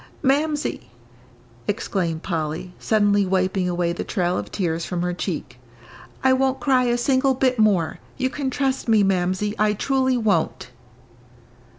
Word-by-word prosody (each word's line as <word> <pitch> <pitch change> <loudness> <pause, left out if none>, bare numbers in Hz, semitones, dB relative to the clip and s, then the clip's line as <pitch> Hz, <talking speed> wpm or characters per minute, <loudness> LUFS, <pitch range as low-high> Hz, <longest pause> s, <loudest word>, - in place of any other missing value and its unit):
"Mamsie," 295 +2 0 0.8
exclaimed 175 -5 -2
Polly, 165 0 -3
suddenly 205 -2 +3
wiping 185 -1 0
away 175 -1 0
the - - -4
trail 180 -4 -1
of 105 0 -4
tears 170 -3 -1
from 175 -1 -3
her 180 0 -1
cheek, 175 -8 -5 0.6
"I 260 0 +5
won't 265 0 +1
cry 255 0 +3
a 240 0 +1
single 260 +2 +2
bit 255 -2 +1
more. 195 -7 +2 0.2
You 260 -1 0
can 280 -3 -2
trust 270 -1 -1
me, 220 -2 +4
Mamsie, 190 +2 0
I 210 0 +3
truly 260 +3 +1
won't." 160 - 0
205 Hz, 145 wpm, -23 LUFS, 175-260 Hz, 0.8 s, I